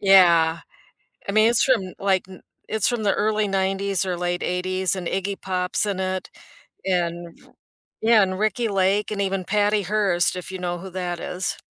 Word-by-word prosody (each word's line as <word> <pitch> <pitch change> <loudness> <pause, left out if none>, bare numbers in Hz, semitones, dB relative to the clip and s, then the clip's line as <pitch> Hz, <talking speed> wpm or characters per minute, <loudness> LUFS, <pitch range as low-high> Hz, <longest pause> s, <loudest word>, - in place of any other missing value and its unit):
Yeah. 170 -4 +5 0.7
I - - -1
mean, 215 +2 +5
it's 240 - +3
from 255 -7 +3
n - - -12
like, 195 -2 +1
n 185 - -12 0.3
it's 220 -2 +1
from 240 -3 -2
the 200 - +3
early 215 0 +1
'90s, 195 0 0
or 180 -1 -1
late 175 0 -2
'80s, 185 +1 -1
and 180 -2 -5
Iggy 195 +1 -3
Pop's 185 +2 -1
in 195 -2 -2
it, 185 0 -3 0.6
and 175 -2 -2
f - - -21 0.5
Yeah, 220 -1 +5
and 185 -1 0
Ricki 220 +2 0
Lake, 195 +1 +1
and 210 -1 -3
even 190 -1 -1
Patty 205 +1 +1
Hearst, 195 -3 +1
if 180 0 -6
you 190 - -5
know 175 -1 -3
who 190 +2 -9
that 175 -1 -4
is. 185 +1 -3
190 Hz, 190 wpm, -23 LUFS, 180-205 Hz, 0.7 s, Yeah